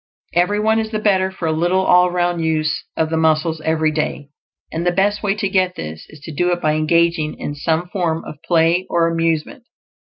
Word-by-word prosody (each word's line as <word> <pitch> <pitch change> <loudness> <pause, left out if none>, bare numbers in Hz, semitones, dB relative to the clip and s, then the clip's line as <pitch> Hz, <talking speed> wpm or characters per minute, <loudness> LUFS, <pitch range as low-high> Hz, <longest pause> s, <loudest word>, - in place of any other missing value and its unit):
Every 180 +5 +2
one 220 +1 +2
is 220 0 -2
the 220 - -2
better 195 -3 +2
for 190 -3 -5
a - - +1
little 175 +4 +1
all 180 0 +5
round 175 -1 0
use 155 -1 -1
of 160 0 0
the 160 - 0
muscles 160 0 +1
every 160 0 +1
day; 150 -2 -3 0.4
and 165 - -3
the 175 - +2
best 200 +3 +1
way 200 -1 0
to 210 -1 -1
get 185 -1 +1
this 80 +1 -7
is 150 - -14
to 160 - -8
do 175 +4 +1
it 175 - 0
by 155 -2 +1
engaging 155 0 +1
in 145 - -5
some 160 +4 -1
form 170 -4 -2
of - - -10
play 170 +1 +2
or 170 -1 +2
amusement. 165 - -1
170 Hz, 215 wpm, -19 LUFS, 160-185 Hz, 0.4 s, all